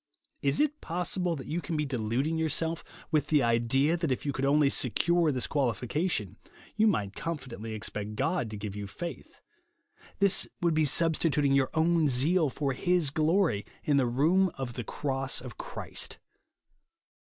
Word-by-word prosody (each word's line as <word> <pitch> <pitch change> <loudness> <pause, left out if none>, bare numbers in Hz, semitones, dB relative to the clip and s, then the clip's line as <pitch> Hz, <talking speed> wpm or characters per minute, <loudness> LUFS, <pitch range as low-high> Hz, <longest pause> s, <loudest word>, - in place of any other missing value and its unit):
Is 140 0 +1
it 300 0 +1
possible 180 0 -1
that 135 - -7
you 170 +3 -2
can 165 -2 -3
be 150 - 0
deluding 130 +4 -1
yourself 160 +1 0 0.3
with 155 -2 +2
the 150 -4 +3
idea 120 +7 +2
that 165 -4 -1
if 130 - -2
you 140 - -1
could 135 +1 -1
only 145 +1 +4
secure 160 +5 +2
this 130 -3 -1
qualification, 125 - -1 0.4
you 220 +1 +4
might 100 - 0
confidently 125 -9 -5
expect 105 0 -4
God 140 0 0
to 105 - -6
give 100 -1 -6
you 105 -1 -5
faith. 170 - -8 0.8
This 200 -1 +2
would 170 -2 +2
be 155 0 +3
substituting 150 -2 +2
your 135 -1 +3
own 160 -1 +3
zeal 150 +6 +2
for 140 0 -2
his 175 +1 +1
glory, 155 - +2 0.2
in 145 -2 +2
the 130 -3 +3
room 165 +10 +3
of 130 -3 -4
the 120 - -5
cross 135 +2 -2
of 125 -3 -10
Christ. - - -4
145 Hz, 165 wpm, -29 LUFS, 125-165 Hz, 0.8 s, only